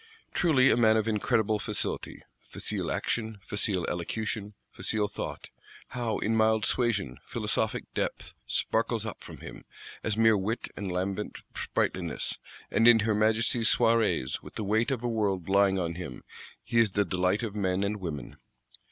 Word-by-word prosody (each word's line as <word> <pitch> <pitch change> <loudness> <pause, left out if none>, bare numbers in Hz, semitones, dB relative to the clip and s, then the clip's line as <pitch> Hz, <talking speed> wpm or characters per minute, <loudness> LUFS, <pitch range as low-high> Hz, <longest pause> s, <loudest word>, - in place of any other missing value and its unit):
Truly 135 -7 +4
a - - +3
man 110 -2 +5
of 110 0 0
incredible 110 0 +1
facility; 105 -1 -4 0.2
facile - - -3
action, 110 -2 -2
facile 100 -4 0
elocution, 105 +4 -3 0.2
facile 105 -2 0
thought: - - -6 0.4
how, 120 -3 -2
in 110 +1 0
mild 110 0 +3
suasion, 105 - 0
philosophic 110 -1 -1
depth - - -3
sparkles - - 0
up - - -7
from - - -10
him, - - -9 0.4
as 110 -1 0
mere 115 -1 +5
wit 105 +4 -2
and 100 -3 -4
lambent 95 +3 -2 0.2
sprightliness; - - -2 0.3
and 115 - +4
in 115 -2 +8
her 110 +1 +1
Majesty's 110 +2 +3
Soirees, 115 - +2
with - - -12
the - - -3
weight 110 +3 +2
of 130 -4 -2
a - - 0
world 100 -6 0
lying 100 0 +4
on 85 -2 -1
him, 85 -7 -7 0.4
he 115 - +1
is 110 -4 +3
the 100 0 +2
delight 90 +4 +1
of 110 -3 -3
men 95 -2 0
and 105 +1 -1
women! 80 -9 -6
105 Hz, 160 wpm, -29 LUFS, 95-115 Hz, 0.4 s, in